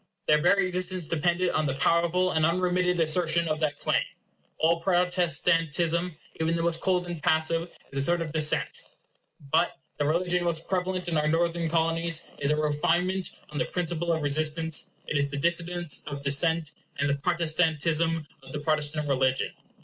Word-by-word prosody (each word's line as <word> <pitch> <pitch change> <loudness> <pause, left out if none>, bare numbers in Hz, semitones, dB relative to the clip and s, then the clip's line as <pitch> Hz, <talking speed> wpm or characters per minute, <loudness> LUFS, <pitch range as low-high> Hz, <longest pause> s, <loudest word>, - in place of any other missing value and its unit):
Their 150 0 +4
very 195 +3 +4
existence 185 -1 -1
depended 175 +3 0
on 155 -1 0
the 135 - -1
powerful 170 +5 +2
and 160 - +1
unremitted 180 +1 +1
assertion 165 +1 +2
of 155 -1 -1
that 150 -2 -1
claim. - - +1 0.6
All 165 +1 +2
Protestantism, 170 -1 +1 0.2
even 160 +1 +1
the 165 - -1
most 165 -1 -1
cold 180 -2 +1
and 175 -3 -6
passive, 165 +1 +1 0.2
is 135 - -2
a - - +2
sort 170 +4 +2
of 155 - -6
dissent. 155 -1 +1 0.7
But - - +2 0.2
the 145 - +1
religion 175 +2 +1
most 165 -2 -2
prevalent 185 -1 -1
in 165 -2 0
our 150 - 0
Northern 165 +1 0
Colonies 165 0 +1 0.2
is 140 - 0
a 150 - +3
refinement 170 +5 0 0.2
on 150 - -4
the - - +1
principle 170 -1 -2
of 160 -2 0
resistance; 155 +2 0 0.2
it 145 - -1
is 140 0 +1
the 145 - -5
dissidence 170 +1 0
of 140 -1 -6
dissent, 155 +2 +1 0.3
and 145 - +1
the 140 - +2
protestantism 165 0 +1 0.2
of - - -13
the 150 - -3
Protestant 150 0 -1
religion. 130 -1 +1
165 Hz, 170 wpm, -27 LUFS, 155-175 Hz, 0.7 s, Their